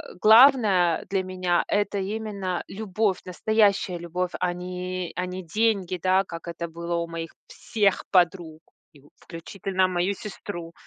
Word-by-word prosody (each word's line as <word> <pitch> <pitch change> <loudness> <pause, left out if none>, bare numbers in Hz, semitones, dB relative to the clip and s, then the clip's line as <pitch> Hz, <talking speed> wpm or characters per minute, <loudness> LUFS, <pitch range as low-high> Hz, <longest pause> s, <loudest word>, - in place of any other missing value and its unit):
"Э. - - -11
Главное 215 - +6
для 195 -1 +1
меня- 185 -1 0
это 205 0 0 0.2
именно 200 -5 -4
любовь, 205 -1 -1
настоящая 200 -1 +1
любовь 180 +1 -3
а 180 -1 +1
не, 180 0 -5
а 180 - -2
не 180 0 -6
деньги", 205 -5 +1
да, 190 +1 +3
как 170 -1 -9
это 170 0 -4
было 170 +1 -5
у 170 0 -2
моих 165 -1 -6 0.2
всех 205 -4 0
подруг 175 -3 +1 0.4
и - - -17 0.2
включительно 185 +2 -2
мою 180 +2 0
сестру. 180 -5 -8
185 Hz, 145 wpm, -25 LUFS, 175-200 Hz, 0.4 s, Главное